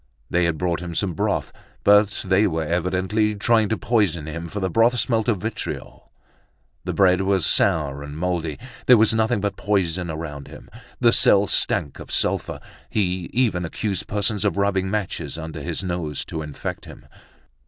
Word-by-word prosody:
They 90 0 +3
had 85 -2 0
brought 85 -1 -1
him 85 -1 -6
some 95 -1 0
broth, - - -1 0.3
but 105 0 +4
they 95 +3 +3
were 80 -3 -1
evidently 90 +6 0
trying 110 0 +2
to 110 - 0
poison 100 -10 +1
him, 85 +2 -5
for 105 - -4
the 95 - 0
broth 115 +7 +3
smelt 115 -3 0
of 115 -4 +2
vitriol. 110 - -6 0.7
The - - -2
bread 95 -1 +4
was 95 -2 +1
sour 70 -3 +2
and 75 +1 -8
moldy. 85 -3 -2 0.3
There 125 - +8
was 110 +1 +4
nothing 110 -2 +1
but 100 -1 -2
poison 90 -4 0
around 75 -3 -6
him. - - -13 0.3
The 120 -2 +4
cell 100 0 +5
stank - - 0
of - - -10
sulphur. - - 0 0.3
He 90 -4 -1
even 115 -8 +1
accused 95 +3 -3
persons 105 0 -1
of 105 -1 0
rubbing 100 -1 +1
matches 100 -5 -3
under 80 -1 -6
his 85 +5 -4
nose 85 -6 -3
to 80 - -5
infect 75 -2 -6
him. - - -13
95 Hz, 175 wpm, -23 LUFS, 85-105 Hz, 0.7 s, There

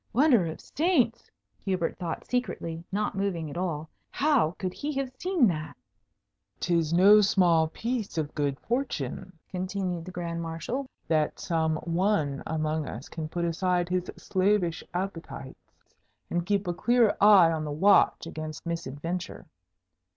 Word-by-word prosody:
"Wonder 245 - +4
of 160 - -6
saints!" 295 -8 0 0.3
Hubert 185 -4 -1
thought 170 -3 -4
secretly, 170 -10 -3
not 210 +2 -1
moving 185 -6 -2
at - - -8
all, 160 -4 -2 0.2
"how 270 - +2
could 185 -2 -3
he 295 - -4
have 270 -2 -2
seen 360 -7 +3
that?" 155 -3 -4 0.8
"'Tis 170 -3 +1
no 200 +5 +7
small 175 -5 +4
piece 225 +3 -3
of 150 -2 -2
good 140 -2 -1
fortune," 225 - -3 0.2
continued 185 -2 -3
the - - -7
Grand 170 -1 -4
Marshal, 165 - -4 0.2
"that 155 -2 +1
some 160 -2 0
one 170 -5 0
among 155 -1 -1
us 120 +5 -7
can 160 -2 -5
put 170 +1 -2
aside 175 +1 0
his 180 0 -1
slavish 185 -3 +1
appetites, 175 -7 -6 0.6
and 175 0 -1
keep 200 -1 +1
a 175 - 0
clear 235 +4 +3
eye 195 -5 +8
on 160 -1 -2
the 150 - -4
watch 195 +6 +4
against 155 -1 -7
misadventure. 170 +1 -4
175 Hz, 145 wpm, -28 LUFS, 160-205 Hz, 0.8 s, eye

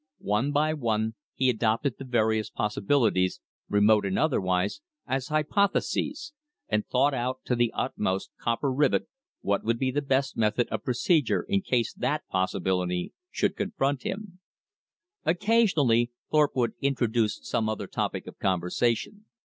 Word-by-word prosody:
One 105 +8 0
by 150 +2 +2
one 110 -6 -1 0.2
he 130 - +2
adopted 115 +2 +1
the 135 - -6
various 110 -3 +1
possibilities, 105 -3 +1 0.3
remote 105 +1 +4
and 95 -1 -1
otherwise, 95 - +1 0.2
as 130 -1 -2
hypotheses, 200 - 0 0.3
and 105 -1 0
thought 140 +3 +2
out 130 +1 -2
to 125 - +1
the 120 -1 +2
uttermost 95 -7 -1
copper 120 +4 0
rivet 145 - +2 0.3
what 100 0 0
would 115 +1 +1
be 130 +1 0
the 145 +3 0
best 135 -1 0
method 110 +2 +1
of 110 -1 -3
procedure 145 - +2
in 200 -1 +1
case 125 - 0
that 150 +1 -2
possibility 90 -1 -1 0.2
should - - 0
confront 140 - -1
him. 190 -2 -6 0.8
Occasionally 160 - +3 0.2
Thorpe 150 -2 +3
would 120 -3 +1
introduce 120 -5 +1
some 110 - 0
other 110 - -3
topic - - -3
of - - -11
conversation. 115 - 0
125 Hz, 140 wpm, -27 LUFS, 110-145 Hz, 0.8 s, remote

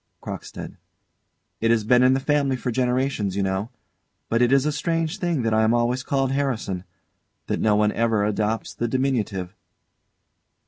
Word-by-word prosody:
CROCKSTEAD. - - -7 0.8
It 115 - +1
has 115 -2 +3
been 125 +3 +4
in 130 +1 +5
the - - +1
family 140 -1 +1
for 125 0 -3
generations, 125 -5 0
you 100 - 0
know; 95 +3 -1 0.6
but 115 +1 +2
it 120 0 +4
is 135 0 +4
a 150 - +1
strange 165 +4 -1
thing 170 - 0
that 115 -1 +1
I 110 - +4
am 110 +2 +3
always 120 +2 +1
called 135 0 0
Harrison, 135 -8 -1
and 90 - -11 0.6
that - - -2
no 105 -1 +3
one 105 0 +3
ever 115 -3 +1
adopts 105 +1 -1
the 120 - -2
diminutive. 115 -8 -1
120 Hz, 175 wpm, -23 LUFS, 110-135 Hz, 0.8 s, in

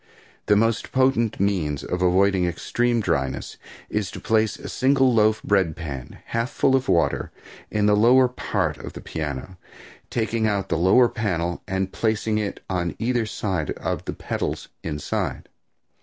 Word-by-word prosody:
The 105 - +5
most 115 +2 +1
potent 130 -4 +2
means 85 -8 0
of 90 - -3
avoiding 95 +1 +3
extreme 120 +7 0
dryness 70 -9 -2 0.3
is 105 -3 -2
to - - -8
place 110 -1 +1
a 140 - -8
single 135 -1 +3
loaf 110 -1 +3
bread 95 -6 +2
pan 70 -7 -7
half 115 +2 -1
full 135 -2 +2
of 130 0 0
water 85 - +1 0.4
in 105 -1 +1
the 105 0 +5
lower 125 +5 +6
part 125 - -2
of - - -8
the - - -8
piano, 80 +3 -5 0.5
taking 110 -1 0
out 100 -2 -1
the 85 - +1
lower 95 +9 +5
panel 90 -7 -2
and 95 0 -2
placing 110 -1 0
it 105 -2 -4
on 90 -2 -2
either 120 -1 0
side 95 -7 -2
of - - -4
the - - -3
pedals - - -4
inside. 75 -3 -3
105 Hz, 155 wpm, -24 LUFS, 90-115 Hz, 0.5 s, lower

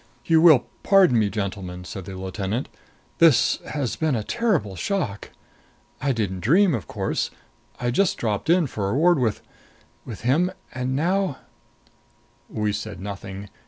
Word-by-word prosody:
"You 160 -1 +4
will 155 -7 +7 0.2
pardon 185 - +5
me, 105 -2 +2
gentlemen," 95 -3 -5
said 95 0 -7
the 95 - -7
lieutenant. 95 +5 -3 0.5
"This 160 -8 +5
has 140 -5 -2
been 155 -4 0
a 110 - -2
terrible 190 - 0
shock! 120 - -3 0.7
I 140 0 +1
didn't 100 -6 -2
dream, 170 - +4
of 100 - -3
course - - -2 0.5
I 120 0 0
just 195 +8 +2
dropped 110 +5 -2
in 175 0 +4
for 105 -7 -3
a 100 - -1
word 170 +2 +4
with 115 -4 -1 0.6
with 115 -5 -8
him. 155 +10 +2 0.2
And 130 0 -2
now 180 +1 0 0.6
" - - -37 0.5
We 105 -1 -1
said 105 -2 -5
nothing. 100 0 -7
120 Hz, 155 wpm, -24 LUFS, 100-160 Hz, 0.7 s, will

